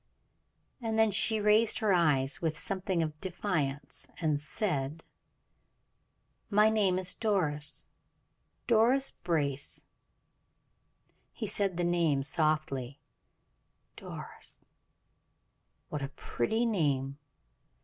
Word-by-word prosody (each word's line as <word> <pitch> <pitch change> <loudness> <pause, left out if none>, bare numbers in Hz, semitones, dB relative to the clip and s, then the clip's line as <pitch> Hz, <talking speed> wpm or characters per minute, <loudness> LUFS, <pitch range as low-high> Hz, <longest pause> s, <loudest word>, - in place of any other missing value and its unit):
And 225 -1 -2
then 220 -1 +4
she 220 +2 +4
raised 210 +2 +4
her 215 -4 +2
eyes 145 -6 +2
with 160 -2 -1
something 190 -4 +1
of 155 -1 -6
defiance, 160 -7 0
and 155 -4 +1
said: 150 - -2 1.5
"My 210 +1 +4
name 200 -4 +2
is 185 0 +2
Doris 160 -10 -1 0.8
Doris 245 +4 +4
Brace." 145 -5 -2 1.5
He 225 - -5
said 200 -3 0
the 175 - 0
name 170 -5 +1
softly. 145 -3 -1 1.0
"Doris! - - -7 1.2
What 150 - -4
a 135 - -3
pretty 220 - -2
name! 140 - 0
170 Hz, 95 wpm, -30 LUFS, 145-210 Hz, 1.5 s, then